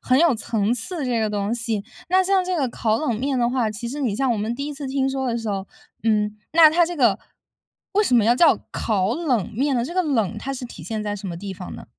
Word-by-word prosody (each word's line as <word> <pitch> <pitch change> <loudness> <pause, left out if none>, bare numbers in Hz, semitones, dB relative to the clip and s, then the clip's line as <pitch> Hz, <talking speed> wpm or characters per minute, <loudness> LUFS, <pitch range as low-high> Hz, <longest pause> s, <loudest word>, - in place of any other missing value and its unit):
很 255 +1 +2
有 330 -5 +4
层 220 -1 -1
次 290 +7 -3
这 240 -3 0
个 215 - +1
东 205 +1 -1
西。 220 -3 -2 0.2
那 375 +1 +4
像 385 0 +3
这 365 -1 -1
个 275 - +1
烤 220 -2 0
冷 260 -5 0
面 270 -1 0
的 235 -1 +2
话， 245 -4 0
其 225 +3 -6
实 275 +5 -5
你 230 -7 0
像 265 0 +1
我 - - -1
们 220 +3 -2
第 280 +3 -4
一 295 - -4
次 280 0 -6
听 265 0 0
说 265 0 -2
的 235 - 0
时 225 -2 -4
候， 195 -1 -3 0.4
嗯， 210 -1 +1
那 320 -1 +8
它 340 +1 +3
这 350 +1 -5
个 235 -9 +3 0.7
为 415 - +3
什 260 - +2
么 230 -3 +5
要 235 +2 +5
叫 315 +2 +5
烤 205 -1 0
冷 255 - -1
面 270 +3 +1
呢？ 235 - +1
这 340 - -6
个 370 - +2
冷 225 - 0
它 275 +5 -4
是 255 - -6
体 240 - -10
现 220 -2 -4
在 205 -1 -2
什 200 -1 -6
么 170 - -5
地 195 +2 -6
方 180 -1 -8
呢？ - - -10
240 Hz, 290 characters per minute, -23 LUFS, 215-285 Hz, 0.7 s, 那